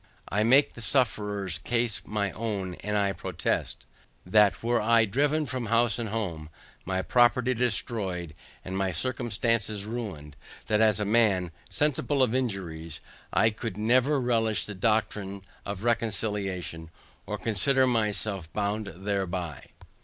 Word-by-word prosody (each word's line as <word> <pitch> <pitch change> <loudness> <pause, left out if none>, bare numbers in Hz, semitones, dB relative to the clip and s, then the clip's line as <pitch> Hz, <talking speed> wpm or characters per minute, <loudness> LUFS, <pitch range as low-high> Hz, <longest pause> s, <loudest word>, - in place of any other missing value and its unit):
I 105 - +1
make 130 +6 +5
the 120 - -9
sufferers 105 - 0
case 115 -2 0
my 100 -2 -1
own, 100 -5 -3
and 105 0 -1
I 100 -1 +1
protest, 85 - -3 0.4
that 105 +3 +4
were 120 0 +2
I 115 +1 +4
driven 145 +8 +1
from 130 -4 -4
house 115 -1 +2
and 115 -2 -2
home, 90 -8 -3 0.4
my 95 +1 -1
property 125 +1 +3
destroyed, 105 -8 -1 0.3
and 95 - -4
my 95 -1 0
circumstances 115 0 -1
ruined, 100 - -6 0.3
that 105 0 +2
as 110 -1 +4
a 105 - 0
man, 100 -5 +2 0.2
sensible 145 -1 +1
of 120 - +1
injuries, 90 - -3 0.3
I 110 - +4
could 105 -2 -5
never 130 +6 +3
relish 115 -3 +1
the 105 - -6
doctrine 100 -1 -1 0.2
of 100 0 -5
reconciliation, 105 -8 -2 0.4
or - - -3
consider 130 +5 +2
myself 105 -7 -1
bound 105 0 -1
thereby. 95 -5 -3
105 Hz, 135 wpm, -28 LUFS, 95-120 Hz, 0.4 s, make